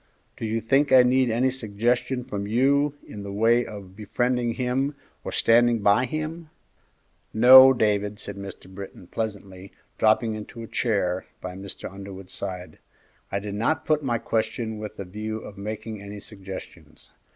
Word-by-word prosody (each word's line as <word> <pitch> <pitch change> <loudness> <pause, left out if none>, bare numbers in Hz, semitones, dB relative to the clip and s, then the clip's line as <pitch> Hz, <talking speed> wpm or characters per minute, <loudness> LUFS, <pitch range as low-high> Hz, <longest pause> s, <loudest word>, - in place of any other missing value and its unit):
Do - - -5
you 115 +1 -1
think 135 +6 +2
I 130 -1 +8
need 130 0 +3
any 125 +3 +2
suggestion 125 +2 -1
from 100 -4 -5
you 140 +6 +2
in 105 - -9
the 100 0 -6
way 115 +4 +3
of 100 -4 -10
befriending 120 +3 -1
him 135 +3 -1 0.3
or - - -5
standing 115 -1 +3
by 105 +5 +4
him?" 155 +4 -5 0.9
"No, 130 +3 +10
Dave," 105 -4 +1
said 100 -1 -6
Mr. 100 -1 -9
Britton, 95 -1 -10
pleasantly, 100 -2 -6 0.3
dropping 110 +1 +3
into 110 +2 -8
a - - -8
chair 100 -7 -1
by 90 0 -6
Mr. 100 +1 -7
Underwood's 95 -1 -10
side, 90 -4 -6 0.5
"I 100 - 0
did 100 0 -5
not 115 +10 0
put 155 -1 +2
my 120 -4 0
question 110 -1 -2
with 105 -1 -7
a 100 - -5
view 110 +4 -5
of 105 -2 -10
making 105 +1 -6
any 100 +1 -8
suggestions. 95 -7 -11
110 Hz, 160 wpm, -25 LUFS, 100-125 Hz, 0.9 s, No